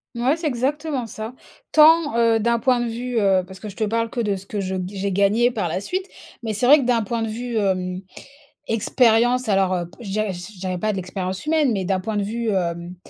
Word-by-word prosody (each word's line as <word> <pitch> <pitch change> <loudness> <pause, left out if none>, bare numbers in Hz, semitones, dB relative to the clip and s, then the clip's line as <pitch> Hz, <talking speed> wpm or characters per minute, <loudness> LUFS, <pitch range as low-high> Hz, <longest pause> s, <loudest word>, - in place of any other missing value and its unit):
Mouais, 250 +5 +2
c'est 330 -1 -3
exactement 280 0 -1
ça. 220 +2 -7 0.4
Tant, 310 -4 +6
heu, 230 -1 +4
d'un 235 +2 +1
point 250 +1 +2
de 240 - -1
vue, 245 +1 -4
heu 195 -3 +3
parce 190 0 -12
que 215 - -6
je 200 - -12
te 220 - +1
parle 230 +2 -1
que 240 - -5
de 210 -4 0
ce 190 0 -8
que 205 +1 -4
je 190 -1 -2
j'ai 200 0 -3
gagné 205 +5 +3
par 205 -8 -2
la 165 - -2
suite. 370 - -3 0.4
Mais 220 -1 -2
c'est 215 +4 0
vrai 290 +4 +8
que, - - -1
d'un 240 -2 +2
point 230 +2 -2
de 225 - -2
vue, 240 +2 -5
hem, 185 -2 -1 0.7
expérience 235 +2 +2
alors, 195 -1 +2
heu, 175 -1 -3
je 215 - -7
dirais 215 -1 -1
je 180 +2 -10
dirais 185 -1 -3
pas 215 +3 0
de - - -4
l'expérience 185 +2 -4
humaine, 305 -4 +2
mais 195 -3 -2
d'un 190 0 0
point 215 +2 -3
de 205 - 0
vue, 225 +2 -2
hem, 175 -2 -2
220 Hz, 240 wpm, -22 LUFS, 195-240 Hz, 0.7 s, vrai